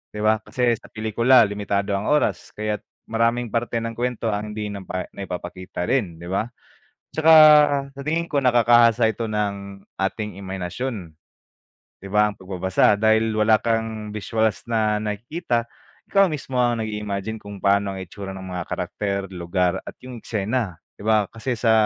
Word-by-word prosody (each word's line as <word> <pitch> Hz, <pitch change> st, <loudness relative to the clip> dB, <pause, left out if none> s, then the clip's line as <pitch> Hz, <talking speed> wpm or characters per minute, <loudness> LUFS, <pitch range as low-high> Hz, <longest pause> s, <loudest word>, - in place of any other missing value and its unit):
di 105 Hz, -, -3 dB
ba? 110 Hz, 0 st, +3 dB
Kasi 120 Hz, +2 st, +1 dB
sa -, -, -15 dB
pelikula 115 Hz, +3 st, +4 dB
limitado 100 Hz, -1 st, -1 dB
ang 100 Hz, +2 st, -3 dB
oras 130 Hz, -11 st, +1 dB
kaya't 105 Hz, 0 st, -2 dB, 0.3 s
maraming 115 Hz, +1 st, +1 dB
parte 115 Hz, 0 st, -1 dB
ng 115 Hz, -, -3 dB
kuwento 120 Hz, -2 st, -2 dB
ang 105 Hz, +1 st, -3 dB
hindi 105 Hz, -1 st, -4 dB
napa 95 Hz, -2 st, -5 dB
naipapakita 90 Hz, -1 st, -6 dB
rin, 100 Hz, -11 st, 0 dB
di 85 Hz, -, -8 dB
ba? 110 Hz, +4 st, 0 dB, 0.7 s
Tsaka 160 Hz, +1 st, +5 dB, 0.6 s
sa 140 Hz, -, -8 dB
tingin 160 Hz, +4 st, -1 dB
ko, 140 Hz, -2 st, +1 dB
nakakahasa 120 Hz, -2 st, +5 dB
ito 115 Hz, +1 st, -3 dB
ng 100 Hz, -2 st, -3 dB, 0.2 s
ating 105 Hz, 0 st, -2 dB
imahinasyon, 95 Hz, 0 st, -5 dB, 0.9 s
di 100 Hz, -, -8 dB
ba, 105 Hz, +1 st, +3 dB
ang -, -, -26 dB
pagbabasa 95 Hz, +2 st, +2 dB
dahil 110 Hz, +1 st, +3 dB
wala 110 Hz, 0 st, +4 dB
kang 110 Hz, -2 st, -2 dB
visuals 110 Hz, +2 st, -1 dB
na 110 Hz, -2 st, +1 dB
nakikita, 120 Hz, -, -2 dB, 0.4 s
ikaw 195 Hz, 0 st, +5 dB
mismo 135 Hz, -4 st, -4 dB
ang 120 Hz, -2 st, +1 dB
nag-imagine 105 Hz, 0 st, -4 dB
kung 100 Hz, -1 st, -10 dB
paano 100 Hz, 0 st, +2 dB
ang -, -, -5 dB
itsura 95 Hz, +2 st, -7 dB
ng 95 Hz, 0 st, -8 dB
mga 90 Hz, -1 st, -3 dB
karakter, 100 Hz, -1 st, -2 dB
lugar 90 Hz, +1 st, 0 dB
at -, -, -9 dB
yung 125 Hz, -2 st, -8 dB
eksena, 105 Hz, -3 st, -2 dB, 0.2 s
di -, -, -10 dB
ba, 110 Hz, -2 st, +4 dB
kasi 120 Hz, +2 st, -3 dB
sa 115 Hz, 0 st, +2 dB
105 Hz, 160 wpm, -23 LUFS, 100-115 Hz, 0.9 s, Tsaka